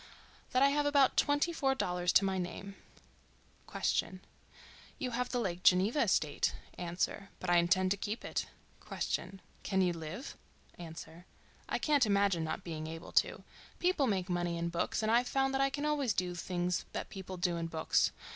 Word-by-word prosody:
—That 255 +1 +3
I 280 - +6
have 290 +1 +1
about 280 -2 +4
twenty 290 +4 +2
four 270 -4 +1
dollars 180 -6 0
to 195 - +6
my 190 -1 0
name. 190 +2 -5 1.0
Q.—You 245 +7 -4
have 250 +1 -1
the 245 - -1
Lake 180 -6 -2
Geneva 190 +10 +4
estate. - - +1 0.2
A.—But 180 +3 -3
I 175 - +6
intend 185 +2 +3
to 200 - +2
keep 210 +4 -4
it. - - -2 0.4
Q.—Can 190 0 -3
you 180 -1 +2
live? 165 - -7 0.4
A.—I 165 +1 -8
can't 290 -6 +3
imagine 200 -4 +2
not 160 +4 -3
being 155 -3 -5
able 165 +1 -8
to. - - +2 0.3
People 350 -6 +2
make 190 -5 0
money 175 -1 -1
in 170 0 -1
books 170 +5 -1
and 215 - +2
I've 240 +2 +4
found 270 0 +1
that 270 - +1
I 275 - +3
can 290 +1 -3
always 285 -6 +1
do 180 0 -1
the 175 - -7
things 180 -1 -1
that - - -4
people 190 -1 -7
do 175 -1 0
in 165 0 -2
books. 160 -1 +1
190 Hz, 170 wpm, -33 LUFS, 175-255 Hz, 1.0 s, I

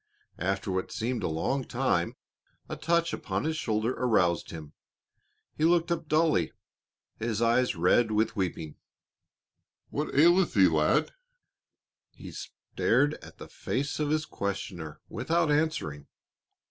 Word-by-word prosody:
After 95 +2 -1
what 95 0 -2
seemed 120 +2 -2
a - - -1
long 85 - -1
time 120 -10 0 0.5
a - - -5
touch 170 0 +1
upon - - -3
his 160 +1 -1
shoulder 115 -5 0
aroused 100 -10 +1
him, 80 -2 -9 0.8
he 155 - -2
looked 170 +1 +3
up 165 -2 -2
dully, 155 - +2 0.7
his 110 -1 -1
eyes 120 0 +2
red 90 +7 +3
with 110 +1 +1
weeping. 85 -6 -3 1.1
"What - - -3
aileth 175 +4 +5
thee, 95 -2 +7
lad?" 75 -2 +2 1.0
He - - -10
stared 145 +1 0
at - - -13
the - - -10
face 145 +3 -3
of 150 -1 0
his 155 +1 +1
questioner 90 - -5
without 165 -2 0
answering. 145 - -1
115 Hz, 130 wpm, -28 LUFS, -, 1.1 s, thee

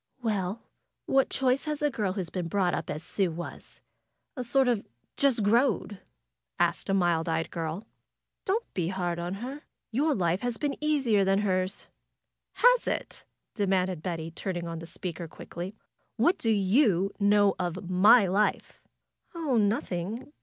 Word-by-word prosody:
'^Well! 205 -1 -1 0.4
What 270 0 +3
choice 260 +1 +1
has 300 -1 -3
a 295 - +2
girl 205 -6 -1
who 200 - -4
has 170 - -6
been 180 -3 -3
brought 180 0 +1
up - - -3
as 155 +2 -4
Sue 195 0 0
was? 170 +1 -8 0.5
A 255 - -3
sort 265 +2 +3
of 235 -4 +1 0.3
^just 265 -6 +2
growed' 220 -2 +2 0.3
!" - - -39
asked 170 - -7
a - - +2
mild 175 -3 +2
eyed 160 0 -1
girl. 165 +4 -4 0.6
Don't 435 +5 0
be 175 -3 -1
hard 175 -2 -2
on 175 +2 -3
her. 275 +3 -6 0.3
Your 290 +6 +2
life 175 -1 +1
has 245 -2 -2
been 290 -2 -1
easier 265 -10 +3
than 195 +1 +2
hers." 185 -1 0 0.7
^^Has - - +5
it?" - - -3 0.3
demanded 190 -4 0
Betty, 165 -2 -4
turning 175 0 -4
on 165 -1 -5
the 165 - -9
speaker 170 -1 -5
quickly. 175 +5 -8 0.4
^^What 345 - +3
do 225 - +1
you 200 - +3
know 205 -1 +4
of 180 0 -3
my 200 +5 +6
life?" 195 +3 0 0.5
'^Oh, 285 -9 +1
nothing. 205 - -2
195 Hz, 160 wpm, -28 LUFS, 175-245 Hz, 0.7 s, my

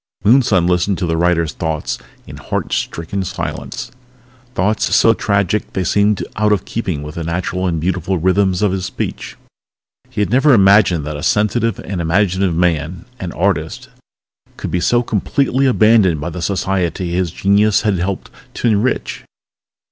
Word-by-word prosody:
Moonson 105 -5 +4
listened 90 +2 +1
to 90 - -2
the 80 -1 -1
writer's 85 -1 +1
thoughts 80 -2 -3 0.3
in - - -10
heart - - -4
stricken 90 +4 -3
silence 90 - -5 0.6
thoughts 105 +4 +1
so 115 - +5
tragic 100 -1 -1
they 95 - -1
seemed 100 +2 +1
out 105 0 +2
of 100 -3 +1
keeping 90 -10 -3
with 75 0 -7
the 85 - -5
natural 90 +2 -2
and 85 -3 -1
beautiful 90 +2 -1
rhythms 95 +2 +1
of 105 - +2
his 95 -1 -2
speech. - - -5 0.7
He - - -6
had 105 - 0
never 135 +3 +4
imagined 95 -6 +4
that 75 -1 -4
a - - -7
sensitive 105 +5 +1
and 95 -3 -5
imaginative 95 +1 +1
man 85 +3 -1
an 90 -2 -5
artist - - -2 0.7
could - - -5
be 90 - 0
so 120 +7 +2
completely 135 +5 0
abandoned 110 - +4
by 80 +4 -4
the 90 - -6
society 95 -1 -1
his 90 0 0
genius 100 +4 +2
had 100 -4 +1
helped 95 +2 -3 0.2
to - - -1
enrich. 110 +4 -1
95 Hz, 160 wpm, -17 LUFS, 85-105 Hz, 0.7 s, so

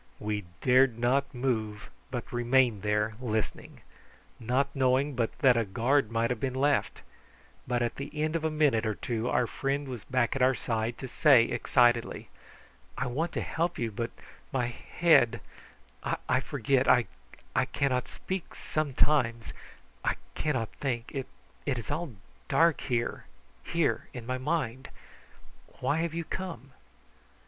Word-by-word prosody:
We 105 -2 -3 0.2
dared 130 -2 +4
not 135 +4 +1
move, 110 -5 -2 0.2
but 125 -3 -5
remained 120 -3 +3
there 105 +1 +1
listening, 110 -4 -3 0.6
not 130 +4 0
knowing 135 +2 +2
but 115 -2 0
that 130 -4 +5
a 115 - +2
guard 120 +5 +1
might 115 +1 0
have 125 - -2
been 130 0 -2
left; 145 +2 +1 0.6
but 120 -1 +1
at 120 - -2
the 140 +1 -5
end 155 +1 0
of 165 - -1
a 160 - +2
minute 150 -7 +2
or 110 - -1
two 120 0 -2
our 125 - +2
friend 140 +4 -2
was 125 -5 -6
back 125 0 +1
at 135 - -1
our 130 +1 +5
side, 115 0 -2
to 130 - -6
say 130 -2 +6
excitedly: 120 0 +2 0.7
"I - - -1
want 155 +8 -1
to - - -1
help 170 +1 -1
you, 115 -2 -2
but 115 +3 -3 0.4
my 130 -2 +1
head 125 0 +3 0.9
I 130 - +3
forget 135 -1 0
I 125 -2 +5 0.7
cannot 130 -3 0
speak 190 -2 -5
sometimes 140 -5 0 0.5
I - - +1 0.2
cannot 130 -8 -1
think. 120 -4 -2
It 135 0 -5
is 115 - -5
all 155 -2 -3 0.3
dark 165 -2 +3
here 120 -2 -2 0.4
here 170 -3 0
in 120 -2 -6
my 130 +1 -2
mind. 130 -3 -2 0.9
Why 150 - +1
have 165 0 -1
you 170 - -1
come?" 165 -6 -6
130 Hz, 145 wpm, -29 LUFS, 115-140 Hz, 0.9 s, say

